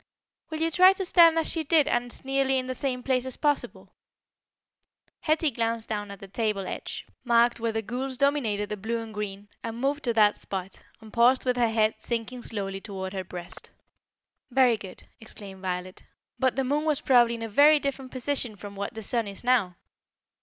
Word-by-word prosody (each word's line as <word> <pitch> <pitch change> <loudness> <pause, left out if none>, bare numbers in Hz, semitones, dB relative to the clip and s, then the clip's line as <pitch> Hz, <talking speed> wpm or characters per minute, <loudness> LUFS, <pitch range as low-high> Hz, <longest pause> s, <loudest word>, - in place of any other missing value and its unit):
"Will 315 -1 -4
you 330 0 +1
try 370 +4 +7
to 385 0 -4
stand 335 -2 +6
as 325 - +1
she 325 - 0
did 310 -1 +3
and 240 -3 0
as - - -4
nearly 270 0 +1
in 255 - -1
the 255 - -3
same 255 -1 -2
place 260 -1 0
as 260 - -3
possible?" 295 -1 -1 1.3
Hetty 310 -1 +1
glanced 230 -1 -2
down 205 -2 -3
at 200 -1 -9
the 195 - -10
table 205 -1 -2
edge, - - -6 0.2
marked 235 -1 +3
where 230 0 -1
the 225 0 -2
gules 255 +4 -4
dominated 245 -8 +1
the 210 - -4
blue 225 +4 -2
and 225 -1 -7
green, 205 -1 -6
and 230 0 -6
moved 280 +3 -1
to 235 - +1
that 210 -2 +4
spot, 190 -1 -5
and 220 -1 -14
paused 245 +3 +4
with 250 -1 +1
her 235 -2 +3
head 220 -1 +2
sinking 235 +2 -4
slowly 195 -4 -4
towards 190 -2 -6
her 190 -1 -3
breast. 175 -1 -8 0.8
"Very 255 -2 +4
good," 195 -4 -10 0.2
exclaimed 200 -4 -10
Violet. 185 0 -4 0.4
"But 260 -1 +2
the 270 - 0
moon 290 +4 0
was 305 -3 +1
probably 240 -3 +4
in 230 - -6
a - - -3
very 290 +8 +6
different 275 -2 -4
position 255 -3 -1
from 200 +1 -10
what 200 +3 -5
the 220 - -6
sun 230 +1 0
is 200 +2 -7
now." 235 -8 +2
235 Hz, 200 wpm, -27 LUFS, 205-270 Hz, 1.3 s, try